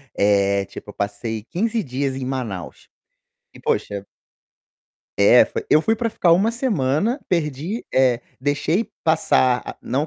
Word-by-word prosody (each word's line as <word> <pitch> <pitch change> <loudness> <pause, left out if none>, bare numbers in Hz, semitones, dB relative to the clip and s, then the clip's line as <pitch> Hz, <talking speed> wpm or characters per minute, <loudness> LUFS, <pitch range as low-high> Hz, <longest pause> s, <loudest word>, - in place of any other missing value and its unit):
Eh, 100 -1 +2
tipo 105 - -10
eu - - -14
passei 105 +2 -3
15 220 - -1
dias 135 -2 -2
em 135 - -4
Manaus. 110 - -5 0.7
E - - -13
poxa 100 -1 -2 1.1
É, 100 +5 +7
foi - - -5
eu 155 - +5
fui 225 - +2
para 230 +1 -1
ficar 180 -6 +2
uma 195 +6 +3
semana, 225 - 0
perdi 165 - -2
eh, 130 -2 +3 0.2
deixei 150 - 0
passar 130 -6 +3
a - - -7
não 135 +5 -1
135 Hz, 145 wpm, -21 LUFS, 115-185 Hz, 1.1 s, É